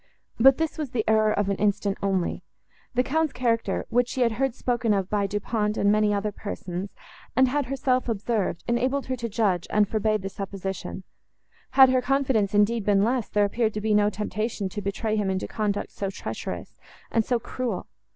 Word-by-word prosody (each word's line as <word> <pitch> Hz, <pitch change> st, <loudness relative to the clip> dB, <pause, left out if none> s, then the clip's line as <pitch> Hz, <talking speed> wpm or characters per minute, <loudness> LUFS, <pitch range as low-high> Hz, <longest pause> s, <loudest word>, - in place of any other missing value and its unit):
But 265 Hz, +3 st, +7 dB
this 320 Hz, -1 st, -2 dB
was 300 Hz, -4 st, -2 dB
the 230 Hz, -3 st, -2 dB
error 215 Hz, 0 st, +4 dB
of 205 Hz, -1 st, 0 dB
an 200 Hz, -, 0 dB
instant, 205 Hz, -1 st, +1 dB
only; 190 Hz, -3 st, 0 dB, 0.5 s
the 250 Hz, -, +3 dB
Count's 315 Hz, +2 st, 0 dB
character, 235 Hz, -2 st, 0 dB
which 245 Hz, +1 st, +3 dB
she 255 Hz, -, -2 dB
had 235 Hz, -1 st, +4 dB
heard 255 Hz, +2 st, -1 dB
spoken 240 Hz, -5 st, +1 dB
of 195 Hz, -1 st, -2 dB
by 205 Hz, -1 st, +1 dB
Du 205 Hz, +1 st, -2 dB
Pont 210 Hz, 0 st, -1 dB
and 200 Hz, -, +3 dB
many 210 Hz, 0 st, +3 dB
other 205 Hz, +1 st, 0 dB
persons, 190 Hz, -2 st, -6 dB, 0.4 s
and 260 Hz, +2 st, +5 dB
had 280 Hz, 0 st, 0 dB
herself 255 Hz, -1 st, 0 dB
observed, 215 Hz, -4 st, -1 dB
enabled 255 Hz, +4 st, 0 dB
her 260 Hz, -, -2 dB
to 235 Hz, -2 st, -4 dB
judge, 200 Hz, -5 st, 0 dB
and 210 Hz, -1 st, +3 dB
forbade 215 Hz, -1 st, 0 dB
the 195 Hz, -, -3 dB
supposition; 195 Hz, -1 st, -5 dB, 0.7 s
had 265 Hz, -1 st, +8 dB
her 255 Hz, 0 st, +3 dB
confidence, 250 Hz, -6 st, +1 dB
indeed, 210 Hz, +2 st, +3 dB
been 200 Hz, -1 st, +3 dB
less, 240 Hz, +1 st, 0 dB
there 205 Hz, -1 st, +3 dB
appeared 220 Hz, +1 st, 0 dB
to 210 Hz, -, -2 dB
be 215 Hz, 0 st, +1 dB
no 210 Hz, 0 st, +4 dB
temptation 210 Hz, 0 st, -3 dB
to 205 Hz, +2 st, -5 dB
betray 215 Hz, +2 st, -2 dB
him 205 Hz, -2 st, 0 dB
into 190 Hz, 0 st, -2 dB
conduct 210 Hz, -2 st, -2 dB
so 195 Hz, -, -3 dB
treacherous, 195 Hz, -, -6 dB, 0.3 s
and 225 Hz, -, +2 dB
so 245 Hz, +2 st, +1 dB
cruel. 230 Hz, -4 st, -4 dB
215 Hz, 195 wpm, -25 LUFS, 200-245 Hz, 0.7 s, had